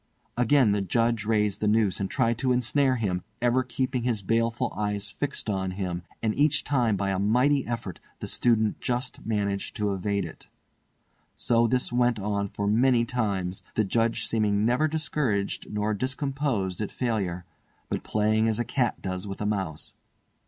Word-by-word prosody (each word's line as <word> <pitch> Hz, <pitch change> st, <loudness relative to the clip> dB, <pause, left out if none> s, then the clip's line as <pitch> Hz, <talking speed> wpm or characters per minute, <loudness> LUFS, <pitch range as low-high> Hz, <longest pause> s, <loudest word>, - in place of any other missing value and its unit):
Again 125 Hz, -1 st, +4 dB
the 100 Hz, 0 st, +1 dB
Judge 115 Hz, +2 st, +1 dB
raised 105 Hz, -2 st, +1 dB
the 105 Hz, -, 0 dB
noose 105 Hz, -2 st, +2 dB
and 95 Hz, -1 st, -2 dB
tried 115 Hz, -4 st, +1 dB
to 130 Hz, 0 st, +1 dB
ensnare 130 Hz, +2 st, +2 dB
him, 95 Hz, -6 st, -1 dB, 0.2 s
ever 120 Hz, +1 st, +3 dB
keeping 125 Hz, 0 st, -2 dB
his 115 Hz, -4 st, -1 dB
baleful 115 Hz, +3 st, 0 dB
eyes 105 Hz, -1 st, -2 dB
fixed 140 Hz, +2 st, -4 dB
on 95 Hz, -3 st, -1 dB
him, 90 Hz, -3 st, -2 dB, 0.2 s
and 110 Hz, -1 st, +1 dB
each 150 Hz, +1 st, +3 dB
time 120 Hz, -7 st, +1 dB
by 100 Hz, 0 st, 0 dB
a 95 Hz, -, -1 dB
mighty 125 Hz, +7 st, +3 dB
effort 115 Hz, -7 st, -4 dB, 0.2 s
the -, -, -6 dB
student 110 Hz, -3 st, +1 dB
just 125 Hz, +1 st, -3 dB
managed 100 Hz, -2 st, -2 dB
to 105 Hz, -2 st, 0 dB
evade 100 Hz, 0 st, -1 dB
it. 80 Hz, -, -10 dB, 0.9 s
So 120 Hz, -1 st, +2 dB
this 125 Hz, 0 st, 0 dB
went 120 Hz, -1 st, +3 dB
on 100 Hz, 0 st, -1 dB
for 100 Hz, +1 st, -4 dB
many 120 Hz, +3 st, +3 dB
times, 100 Hz, -7 st, -2 dB
the 110 Hz, -, +3 dB
Judge 115 Hz, +3 st, 0 dB
seeming 105 Hz, -2 st, +1 dB
never 125 Hz, +7 st, +3 dB
discouraged 145 Hz, -9 st, -1 dB
nor 105 Hz, +1 st, 0 dB
discomposed 130 Hz, -, -1 dB
at 105 Hz, -, -3 dB
failure, 95 Hz, -8 st, -2 dB, 0.4 s
but -, -, -2 dB
playing 110 Hz, +1 st, +1 dB
as 110 Hz, -1 st, +1 dB
a 120 Hz, -, -1 dB
cat 125 Hz, -4 st, -1 dB
does 95 Hz, +1 st, -3 dB
with 100 Hz, -, -6 dB
a 105 Hz, -, -2 dB
mouse. 95 Hz, -7 st, -2 dB
110 Hz, 170 wpm, -27 LUFS, 100-125 Hz, 0.9 s, Again